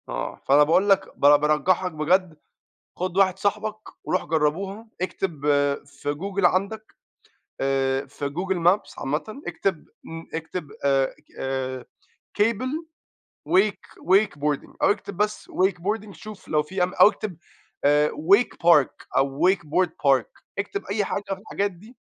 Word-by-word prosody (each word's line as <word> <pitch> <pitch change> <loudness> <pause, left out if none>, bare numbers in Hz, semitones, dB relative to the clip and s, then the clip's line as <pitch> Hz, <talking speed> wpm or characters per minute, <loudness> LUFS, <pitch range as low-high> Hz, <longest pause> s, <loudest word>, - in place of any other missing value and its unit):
آه. - - -4
فأنا 145 +2 +6
باقول 180 +7 +3
لك 195 -1 +2
ب - - -26 0.2
بارجّحك 170 +5 +1
بجد 165 +2 +1 0.6
خُد 185 0 -3
واحد 190 -1 +3
صاحبك 210 +2 -1 0.3
وروح 185 - 0
جرّبوها، 175 +8 -1 0.2
اكتب 185 -4 -3 0.5
في 145 +1 -4
Google 195 +4 -3
عندَك 200 +5 0 0.7
آآ 135 0 +1
في 140 +1 -5
Google 185 +5 -2
Maps 195 +4 +1
عامةً 155 - -3
اكتب 190 -5 -2 0.2
م 165 0 -8
اكتب 165 0 -5
آآ 135 -1 +4
اك - - -27
آآ 130 -1 -3 0.6
cable 255 +9 0 0.6
wake 200 +2 +2 0.2
wake 195 +4 +4
wakeboarding 145 0 -2
أو - - +5
اكتب 200 -2 -5
بس 210 +1 -1
wakeboarding 200 +3 -1
شوف 215 0 -11
لو 150 -1 +1
في 180 +4 -1
أم 180 +1 -1
أو - - +7
اكتب 205 -6 -6 0.5
آآ 150 +1 +4
wake 200 +10 +3
park 150 -6 +4
أو 140 +6 +3
wakeboard 180 -1 +1
park، 135 -6 0 0.2
اكتب 400 - -3
أي 205 0 -1
حاجة 200 - -3
في 190 - -8
الحاجات 200 -1 -2
دي، 215 +8 -16
180 Hz, 145 wpm, -24 LUFS, 150-200 Hz, 0.7 s, أو